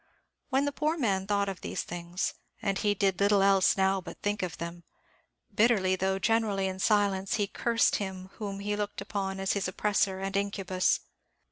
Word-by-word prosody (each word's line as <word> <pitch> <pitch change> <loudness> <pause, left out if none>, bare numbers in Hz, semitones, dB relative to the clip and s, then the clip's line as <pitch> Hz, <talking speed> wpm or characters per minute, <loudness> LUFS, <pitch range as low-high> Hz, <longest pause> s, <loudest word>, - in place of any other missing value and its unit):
When 270 +1 +2
the 285 - 0
poor 305 +3 0
man 195 - 0
thought 200 -1 +1
of 195 -2 -5
these - - -3
things 175 +1 -3 0.3
and 195 -1 -1
he 205 -1 +1
did 195 -2 +1
little 200 0 +4
else 195 -1 +4
now 190 0 +2
but 180 - -10
think 205 0 0
of 180 -3 -3
them 170 +1 -6 0.7
bitterly, 200 -4 +3
though 190 +1 0
generally 215 -2 +1
in 190 0 -3
silence, 195 -2 +2
he 205 - +1
cursed 230 +3 +1
him 190 -2 -5
whom 200 -2 -4
he 205 +1 -1
looked 205 0 -3
upon 195 -1 -3
as 195 0 +1
his 200 -2 -1
oppressor 195 0 0
and 195 0 -3
incubus. 195 -2 +1
195 Hz, 180 wpm, -29 LUFS, 190-205 Hz, 0.7 s, little